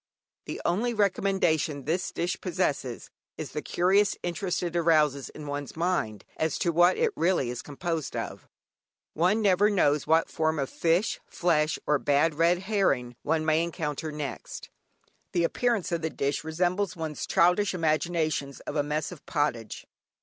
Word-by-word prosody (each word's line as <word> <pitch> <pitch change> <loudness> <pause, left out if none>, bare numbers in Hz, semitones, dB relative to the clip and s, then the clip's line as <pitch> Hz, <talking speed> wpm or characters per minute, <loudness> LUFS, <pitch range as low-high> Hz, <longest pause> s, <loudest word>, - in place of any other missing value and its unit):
The - - -5
only 230 +7 +1
recommendation 185 -8 +1
this 175 +4 -1
dish 175 +2 -2
possesses 140 -8 -2 0.3
is - - -6
the - - -3
curious 195 +3 +2
interest 180 +1 -2
it 175 -1 -3
arouses 155 -5 +2
in 150 - -10
one's 145 -1 -5
mind 160 - -1
as 160 -2 0
to 170 - +1
what 175 +2 +4
it - - +1
is - - +4
really 160 -8 +1
composed 160 +2 -4
of. - - -5 0.7
One 185 +7 +2
never 200 +1 +4
knows 150 -9 +2
what 160 +1 +4
form 160 -1 0
of 135 -2 -2
fish, 170 +5 +1
flesh, 155 -3 +1
or 150 -1 +2
bad 145 +4 +2
red 170 +4 +2
herring 165 - +1
one 160 -1 0
may 155 +1 +3
encounter 155 -2 -3
next. 150 -3 -6 0.6
The 175 - +2
appearance 230 +2 0
of 170 -1 -1
the 160 - -1
dish 140 -1 -2
resembles 175 +4 0
one's 160 -3 -4
childish 180 +3 +3
imaginations 155 -3 0
of - - -6
a 145 - +3
"Mess 150 +3 -2
of 170 -5 -11
Pottage." 130 -8 -2
165 Hz, 155 wpm, -27 LUFS, 150-180 Hz, 0.7 s, what